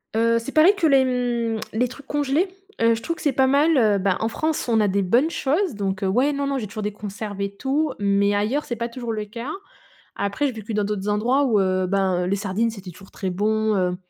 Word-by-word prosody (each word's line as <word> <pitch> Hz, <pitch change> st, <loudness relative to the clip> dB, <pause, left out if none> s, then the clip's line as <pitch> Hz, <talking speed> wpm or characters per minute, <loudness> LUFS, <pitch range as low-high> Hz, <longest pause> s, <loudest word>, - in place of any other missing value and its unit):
Heu, 230 Hz, +1 st, +3 dB
c'est 230 Hz, +4 st, -7 dB
pareil 315 Hz, +7 st, +6 dB
que 330 Hz, -5 st, +3 dB
les, 270 Hz, -2 st, +5 dB
mmh, 240 Hz, -3 st, -1 dB
les 245 Hz, +3 st, +1 dB
trucs 270 Hz, +3 st, -12 dB
congelés, 290 Hz, +6 st, 0 dB, 0.3 s
heu, 230 Hz, 0 st, +4 dB
je 225 Hz, -, -7 dB
trouve 335 Hz, +7 st, -3 dB
que -, -, -12 dB
c'est 290 Hz, -, +2 dB
pas 265 Hz, 0 st, +3 dB
mal, 290 Hz, +4 st, +3 dB
heu, 215 Hz, -5 st, +4 dB
bah, 190 Hz, -1 st, +1 dB
en 220 Hz, -, 0 dB
France 310 Hz, +7 st, -2 dB
on 230 Hz, -2 st, +3 dB
a 210 Hz, -, +3 dB
des 200 Hz, +1 st, +1 dB
bonnes 240 Hz, -, +3 dB
choses 330 Hz, -, 0 dB
donc, 195 Hz, -1 st, -3 dB
heu, -, -, +1 dB
ouais, 255 Hz, +9 st, +2 dB
non, 280 Hz, 0 st, -2 dB
non 275 Hz, -1 st, -1 dB
j'ai 225 Hz, -5 st, -4 dB
toujours 215 Hz, +2 st, -6 dB
des 210 Hz, -, -1 dB
conserves 205 Hz, 0 st, -7 dB
et 200 Hz, 0 st, -2 dB
tout. 280 Hz, +7 st, 0 dB
Mais 200 Hz, 0 st, +2 dB
ailleurs 220 Hz, +9 st, 0 dB
c'est 240 Hz, -, -3 dB
pas 235 Hz, +1 st, -3 dB
toujours 235 Hz, -1 st, -5 dB
le 215 Hz, -1 st, -3 dB
cas. 230 Hz, +6 st, -7 dB, 0.7 s
Après 200 Hz, +9 st, -1 dB
j'ai -, -, -2 dB
vécu 220 Hz, 0 st, -7 dB
dans 210 Hz, 0 st, +1 dB
d'autres 205 Hz, -1 st, -3 dB
endroits 245 Hz, +7 st, +2 dB
où, 225 Hz, -6 st, +3 dB
heu, 185 Hz, -1 st, +1 dB
ben, 190 Hz, -2 st, +1 dB
heu, -, -, -2 dB
les 195 Hz, -, +1 dB
sardines 205 Hz, +3 st, -1 dB
c'était 195 Hz, -4 st, -9 dB
toujours 190 Hz, +3 st, -16 dB
très 190 Hz, -, -4 dB
bon, 215 Hz, +3 st, +1 dB
heu. 180 Hz, -1 st, 0 dB
225 Hz, 255 wpm, -23 LUFS, 200-265 Hz, 0.7 s, pareil